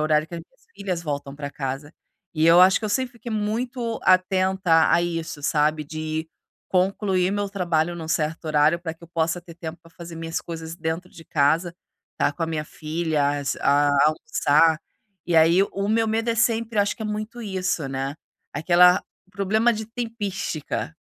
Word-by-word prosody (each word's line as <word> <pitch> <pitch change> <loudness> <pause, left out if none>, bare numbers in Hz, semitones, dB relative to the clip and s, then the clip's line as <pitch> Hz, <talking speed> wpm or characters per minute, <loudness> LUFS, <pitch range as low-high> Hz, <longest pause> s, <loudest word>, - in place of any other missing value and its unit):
o - - +1
horário 155 0 +2
que 170 - -9
as 165 - -5
minhas 165 - -22
filhas 190 -4 -3
voltam 140 -1 -4
pra 145 -1 -5
casa. 140 +2 -5 0.4
E 155 +1 +1
eu 170 +2 +7
acho 190 +4 +6
que - - -6
eu - - -1
sempre 250 +4 -1
fiquei 235 0 -9
muito 230 +2 -2
atenta 185 -2 +3
a 170 - +5
isso, 165 -3 -3
sabe? 150 +1 +1
De 155 +1 -4 0.4
concluir 185 0 +1
meu 205 0 -1
trabalho 175 -3 0
num 160 -2 -7
certo 160 +1 -1
horário 155 +2 +3
pra 165 -2 -4
que 165 +1 -15
eu - - -17
possa 165 +1 -1
ter 170 -1 -13
tempo 165 -1 -7
pra 165 - -18
fazer 170 -1 -9
minhas 165 0 -3
coisas 165 -1 -7
dentro 165 +2 -4
de 165 - -13
casa, 160 +4 +1 0.5
tá 145 - +2
com 165 - -5
a - - +1
minha 155 -2 -3
filhas, 150 -3 -1
a 145 +1 +3 0.2
almoçar. 155 +1 +3 0.4
E 170 -1 0
aí, 165 +4 +6
o 200 0 -2
meu 225 0 +2
medo 225 +2 -1
é 230 - +2
sempre, 230 -1 +1
acho 200 - 0
que 220 - -7
é - - -3
muito 215 +3 -5
isso, 185 -7 -2
né? 135 +2 -3 0.4
Aquela 180 +4 +5 0.3
o - - -29
problema 215 +5 +2
de 220 -1 -5
"tempística." 210 - -4
170 Hz, 190 wpm, -24 LUFS, 155-200 Hz, 0.5 s, eu